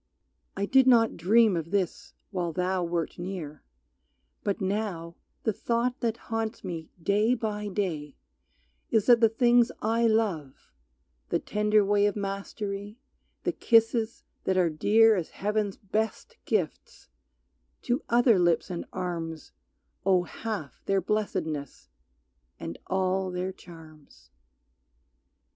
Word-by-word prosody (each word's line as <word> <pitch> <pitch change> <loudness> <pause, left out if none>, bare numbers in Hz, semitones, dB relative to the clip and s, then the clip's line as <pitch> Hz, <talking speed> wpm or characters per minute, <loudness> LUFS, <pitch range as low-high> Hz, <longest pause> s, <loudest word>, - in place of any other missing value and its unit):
I 200 - 0
did 265 +4 +4
not 230 -3 +5
dream 210 +4 +4
of 165 -1 -3
this 190 -3 -2 0.2
while 175 -4 -2
thou 180 +1 0
wert 170 -1 -2
near, 175 -5 -6 0.8
But 200 - -1
now 190 -4 -2 0.3
the 220 - +1
thought 240 +4 -1
that 230 -1 -1 0.2
haunts 225 +1 -2
me 165 -4 -5
day 210 +7 +2
by 210 -3 -3
day 170 -8 -3 0.7
Is 220 -3 +2
that 240 -1 +6
the 225 - +6
things 240 +1 +4
I 230 +2 +2
love, 195 -11 -1 0.6
the - - +2
tender 210 0 +2
way 205 0 +3
Of 205 - -1
mastery, 200 +1 -5 0.5
the - - +1
kisses 225 -1 +2 0.2
that 190 0 +1
are 175 -3 +3
dear 220 +8 +5
As 175 -5 -3
Heaven's 210 -1 -2
best 215 +2 -3
gifts, 190 -9 -2 0.8
to 250 +5 0
other 235 -3 +5
lips 175 +2 +2
and 175 - -4
arms 165 -3 -5 0.5
Owe 185 -2 +3
half 185 - -6
their 195 0 +3
blessedness 160 - -3 0.7
and 85 - -6
all 190 0 0
their 180 +1 -3
charms. 155 - -15
200 Hz, 125 wpm, -28 LUFS, 175-220 Hz, 0.8 s, that